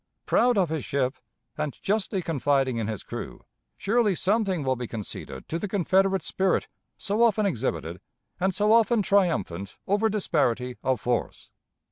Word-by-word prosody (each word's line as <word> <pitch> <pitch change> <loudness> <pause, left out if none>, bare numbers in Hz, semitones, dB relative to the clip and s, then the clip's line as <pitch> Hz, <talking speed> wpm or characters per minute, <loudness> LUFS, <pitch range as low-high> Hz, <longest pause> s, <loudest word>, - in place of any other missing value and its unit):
Proud 245 -2 +3
of 185 -5 +2
his 160 -3 -2
ship, 135 0 -1 0.4
and 150 -3 -2
justly 195 -2 0
confiding 135 -5 +1
in 110 -2 -2
his 110 -3 -4
crew, - - -7 0.3
surely 215 -2 +2
something 195 -3 +1
will 130 -1 +1
be 125 -1 -5
conceded 105 -11 -7
to 165 - -3
the 205 - -3
Confederate 190 -1 +2
spirit 190 +1 0 0.3
so 210 +2 -1
often 220 -3 +4
exhibited 90 - -2 0.4
and 190 +1 +2
so 210 +2 +3
often 225 -1 +4
triumphant 165 - 0
over 205 +3 +2
disparity 125 - 0
of 130 -3 0
force. 120 +2 -2
180 Hz, 150 wpm, -26 LUFS, 125-205 Hz, 0.4 s, often